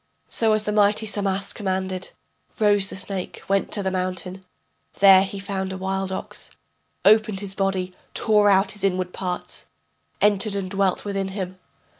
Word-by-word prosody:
So 225 -2 +2
as 215 0 +2
the 210 - -1
mighty 210 +1 +3
Samas 200 -2 -1
commanded, 190 -2 -3 0.5
Rose 205 -2 +3
the - - -7
snake, 190 -1 -4
went 195 0 +1
to 205 - +1
the 190 - 0
mountain, 185 0 -3 0.5
There 195 -1 +8
he 200 +1 -5
found 195 -1 -3
a 190 - -5
wild 190 0 -2
ox, 190 - -5 0.6
Opened 215 -1 +5
his 200 -1 -5
body, 190 -2 -1 0.2
tore 210 -2 +4
out 195 0 +4
his 210 -2 0
inward 185 -2 0
parts, 180 -2 -4 0.5
Entered 205 0 +2
and 190 -2 -3
dwelt 195 -1 0
within 195 -1 -2
him. 185 -1 -5
195 Hz, 160 wpm, -23 LUFS, 190-205 Hz, 0.6 s, There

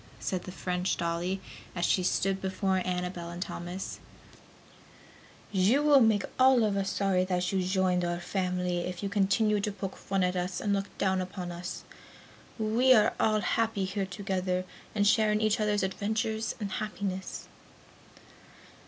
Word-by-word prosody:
said 185 -3 -3
the 185 - -6
French 180 0 -1
dolly, 170 +3 -1 0.4
as 175 -1 0
she 185 - +3
stood 190 +1 0
before 190 0 0
Annabel 180 -1 -3
and 170 0 -7
Thomas, 180 +1 -5 1.5
"You 210 +9 +3
will 295 -2 +7
make 220 -4 +4 0.2
all 260 -2 +6
of 210 -2 +1
us 195 -1 0
sorry 195 -2 +1
that 180 -1 0
you 195 - +1
have 180 - -1
joined 185 -2 +2
our 175 0 -1
family 180 -1 -1
if 180 +2 -4
you 200 - -1
continue 205 +2 +2
to 205 +1 -1
poke 195 -1 -5
fun 195 -1 -1
at 180 0 +1
us 180 0 -2
and 205 - 0
look 195 0 -1
down 190 -1 +1
upon 180 -1 -5
us. 175 +1 -6 0.7
We 235 +4 +4
are 210 -2 +4
all 215 -1 +3
happy 220 -4 0
here 190 0 -2
together 185 -2 -2 0.3
and 205 -1 +2
share 215 +1 +4
in 210 - +2
each 215 0 +2
others' 210 -2 +1
adventures 220 +3 -1
and 205 -3 -4
happiness." 195 -3 -4
190 Hz, 160 wpm, -29 LUFS, 180-210 Hz, 1.5 s, will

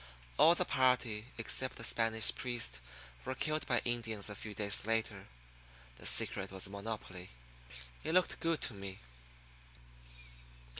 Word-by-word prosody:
All 170 +2 +7
the 180 - +1
party 125 -6 +1
except 130 +3 +1
the - - -7
Spanish 115 -1 +4
priest 115 - -3 0.4
were 130 +1 -4
killed 155 +2 -2
by 120 -2 +1
Indians 115 -4 -2
a - - -5
few 105 0 -7
days 100 -1 +2
later. 110 -3 -2 0.7
The - - 0
secret 95 0 +3
was 95 -1 -3
a 100 - -5
monopoly. 100 -3 -7 0.7
It 160 +2 -2
looked 185 - +2
good 165 -2 -1
to 125 - -1
me. 100 -1 -8
115 Hz, 140 wpm, -34 LUFS, 100-130 Hz, 0.7 s, All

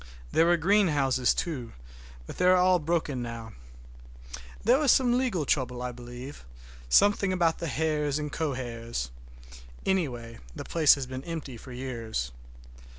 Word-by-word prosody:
There 165 - +4
were 175 0 +4
greenhouses, 150 -9 +3
too, 130 -9 -3 0.5
but - - -9
they 180 - +2
are 185 0 +7
all 180 0 +4
broken 155 -5 -1
now. 115 -2 -7 1.1
There 245 +6 +4
was 295 -4 +4
some 245 -2 +4
legal 245 - 0
trouble, 125 -3 -1
I 125 - -3
believe, 125 - -9 0.5
something 200 - +4
about 170 -3 +1
the 165 -4 -3
heirs 150 -2 0
and 150 -1 -4
co 155 -4 -1
heirs; 115 - -5 0.7
anyhow, 125 -12 -1 0.2
the - - -6
place 160 -3 +5
has 140 -2 -4
been 130 +1 -7
empty 160 -6 -5
for 130 +3 -11
years. 115 - -4
145 Hz, 150 wpm, -28 LUFS, 125-175 Hz, 1.1 s, are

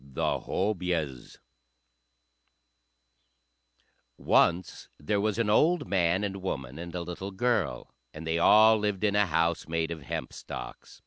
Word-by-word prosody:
The 70 -1 -2
Hobyahs 90 - -2 2.8
Once 85 +1 +1
there 100 +7 -1
was 105 0 0
an 115 -2 +1
old 160 +12 +3
man 90 0 +1
and 100 -1 -4
woman 70 -6 -5
and 85 0 -7
a 90 - -2
little 90 +3 -6
girl, 110 - -1 0.2
and 80 +1 -9
they 80 +1 0
all 110 +4 +6
lived 105 -1 -2
in 105 -1 +2
a 105 -1 +3
house 85 +1 0
made 80 0 -1
of 80 -2 -6
hempstalks. - - -7
90 Hz, 130 wpm, -28 LUFS, 80-105 Hz, 2.8 s, all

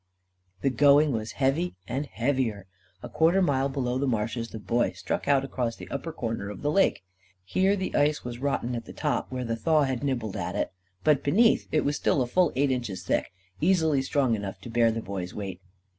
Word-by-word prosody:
The 135 - +2
going 145 +3 +5
was 110 -2 -3
heavy 145 +6 0
and 140 +3 -2
heavier. 120 -6 -1 0.4
A - - -5
quarter 165 +4 +3
mile 140 -6 +2
below 130 -2 -1
the 140 - 0
marshes 115 0 -1
the - - -7
Boy 115 +4 0
struck - - -3
out 140 -1 +3
across 120 -4 -2
the - - -10
upper 150 +4 -4
corner 115 -8 -4
of 105 - -8
the 145 - +1
lake. 195 - +2 0.4
Here 190 - +2
the 190 -2 -3
ice 150 +1 +2
was 120 -1 -5
rotten 135 -3 -1
at 115 -1 -4
the - - -10
top, - - -2
where 125 -1 -3
the 115 -1 -1
thaw 155 +6 +3
had 130 -1 -2
nibbled 120 -7 -2
at - - -3
it, - - -1 0.3
but 150 -3 +3
beneath 220 +11 +3
it 155 - +2
was 145 +1 0
still 135 - +2
a - - -2
full 175 +6 +2
eight 140 +1 +2
inches 120 -7 -3
thick; - - 0 0.3
easily 160 -5 +3
strong 135 -2 +1
enough 100 -3 -4
to 120 - -8
bear 115 -1 +4
the 115 0 -3
Boy's 95 -2 -5
weight. 95 -3 -5
130 Hz, 210 wpm, -27 LUFS, 115-145 Hz, 0.4 s, going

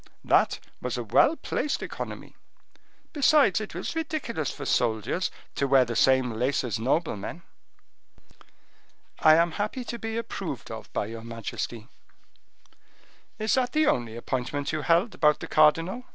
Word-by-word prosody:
that - - +3 0.2
was 125 -1 -3
a 120 - -3
well 195 - +4
placed 300 - -2
economy; - - -7 0.8
besides, 285 - +4
it 215 - -7
was - - -4
ridiculous 295 - -2
for - - -7
soldiers 115 - 0 0.2
to 140 - 0
wear 135 -1 +5
the 115 0 -4
same 130 -1 +3
lace 125 +6 0
as 115 -5 -2
noblemen." 140 - -2 1.8
"I 155 0 +7
am 170 +1 +3
happy 210 +8 -3
to 235 - -5
be 225 0 -4
approved 230 - -5
of - - -8
by - - -1
your 115 +2 -7
majesty." 115 -1 -5 1.5
"Is 215 0 0
that 255 -2 +1
the 310 0 +3
only 120 - 0
appointment 130 +3 -3
you 155 -1 -2
held 170 - +2
about 150 -1 +3
the - - -6
cardinal?" 165 +10 +3
155 Hz, 145 wpm, -27 LUFS, -, 1.8 s, I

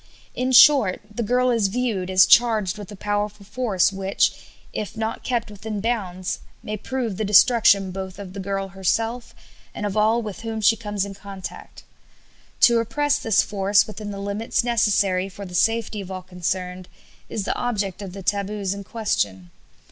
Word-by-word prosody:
In 255 +1 -1
short, 255 -6 +6
the 235 - -3
girl 250 +3 +2
is 225 -4 +2
viewed 205 -4 -2
as 185 0 +6
charged 215 -5 +4
with 205 -1 -9
a - - -8
powerful 205 0 -3
force 205 -4 +1
which, 195 0 +1 0.4
if 215 +1 -5
not 220 0 -3
kept 240 -4 -2
within 210 +1 -5
bounds, 195 -5 -2 0.2
may 215 - -4
prove 230 -2 -3
the 220 - -1
destruction 205 -2 +5
both 190 0 -6
of 195 -2 -9
the 200 - -7
girl 195 0 -3
herself 225 +5 -2 0.4
and 210 - -4
of 205 - -3
all 220 +2 +2
with 215 0 -7
whom 225 -1 -4
she 220 +1 +4
comes 205 -2 -3
in 200 - -7
contact. 195 -1 -9 0.8
To 235 -1 +6
repress 285 +6 0
this 220 -3 +3
force 200 0 +2
within 210 -1 -7
the 200 - -6
limits 200 +4 -1
necessary 200 -5 +1
for 200 +1 -9
the 180 - -10
safety 225 +2 +1
of 190 - -9
all 185 -1 -6
concerned 180 0 -4 0.4
is 215 - -3
the - - -1
object 205 -6 -2
of 190 -3 -7
the 195 0 -8
taboos 200 0 -1
in 200 0 -7
question. 100 - -2
205 Hz, 175 wpm, -23 LUFS, 190-225 Hz, 0.8 s, short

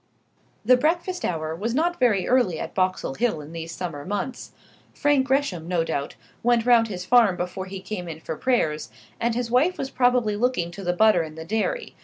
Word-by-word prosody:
The 255 +2 +6
breakfast 345 +6 0
hour 160 -2 -2
was 225 +7 -2
not 345 +4 +1
very 215 -8 +2
early 245 -11 +2
at - - -5
Boxall 185 -6 0
Hill 225 - 0
in 150 +1 -10
these 165 0 -6
summer 165 -4 -5
months. 205 - -4 0.4
Frank 290 -3 +2
Gresham, 255 - 0
no 175 -2 +1
doubt, 150 -3 -3 0.3
went 240 -1 +2
round 235 -2 +5
his 180 -4 -6
farm 225 -5 +4
before 185 +2 -4
he 190 0 -7
came 185 -2 -5
in 160 -2 -7
for 160 - -5
prayers, 155 -10 0 0.3
and 235 0 0
his 240 -1 -2
wife 295 +9 +3
was 270 - -4
probably 245 -5 +2
looking 210 -7 0
to 195 +3 -9
the 175 - +1
butter 215 -1 +4
in 155 -1 -7
the 160 0 -8
dairy. 220 - -2
210 Hz, 200 wpm, -24 LUFS, 175-250 Hz, 0.4 s, The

